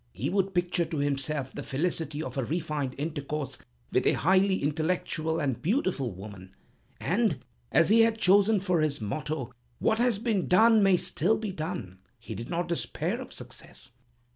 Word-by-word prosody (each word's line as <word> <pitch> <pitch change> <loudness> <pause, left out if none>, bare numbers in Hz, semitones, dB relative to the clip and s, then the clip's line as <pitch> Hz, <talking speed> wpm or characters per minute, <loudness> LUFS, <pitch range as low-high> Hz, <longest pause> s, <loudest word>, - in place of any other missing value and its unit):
He 125 - -3
would 195 -1 0
picture 175 -1 +1
to 160 - -5
himself 140 -1 0
the - - -5
felicity 155 +1 -2
of - - -6
a 135 - -1
refined 150 -2 -2
intercourse 150 -1 -4 0.3
with - - +2
a - - +5
highly 190 +2 +2
intellectual 160 +1 -1
and 135 -5 -1
beautiful 180 - 0
woman, 95 0 -11 0.4
and, - - 0 0.3
as 165 - +4
he 225 +2 +6
had 225 0 +3
chosen 205 +1 +4
for 180 -4 +1
his 150 -2 0
motto, 135 +3 -4 0.2
What 220 - +1
has 240 -3 +3
been 215 -4 -1
done 220 +4 +6
may 195 -2 +5
still 180 +5 +2
be 215 -3 -4
done, 155 - -5 0.2
he 115 - -8
did 115 - -7
not 175 +1 -1
despair 170 -1 -2
of - - -9
success. - - -9
160 Hz, 165 wpm, -28 LUFS, 140-190 Hz, 0.4 s, he